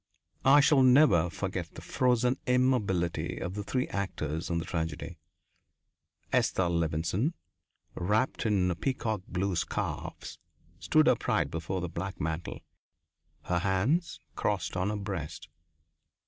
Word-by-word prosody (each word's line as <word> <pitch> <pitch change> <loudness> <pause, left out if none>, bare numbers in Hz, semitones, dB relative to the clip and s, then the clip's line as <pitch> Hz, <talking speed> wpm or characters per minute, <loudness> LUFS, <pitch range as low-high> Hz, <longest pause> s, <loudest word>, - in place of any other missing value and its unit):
I 140 +2 +8
shall 145 -1 +5
never 125 - +5
forget 85 - -4
the - - -8
frozen 125 0 +2
immobility 120 -9 +1
of 90 - -4
the 105 - -4
three 125 +4 -1
actors 80 -5 -3
in 85 - 0
the 85 - -2
tragedy. 80 -3 -4 1.1
Esther 90 -2 +2
Levenson, 85 - 0 0.6
wrapped 105 +7 0
in 95 -4 +2
peacock 110 0 -2
blue 95 +1 -1
scarves, 85 - -4 0.4
stood 155 0 +3
upright 125 - +2
before 85 +3 -3
the 90 - -2
black 95 +3 -5
mantel, 80 +2 -3 0.8
her 90 -1 0
hands 105 - 0 0.2
crossed - - -1
on 90 +2 0
her 105 - -1
breast. 95 -9 -5
95 Hz, 120 wpm, -29 LUFS, 85-125 Hz, 1.1 s, I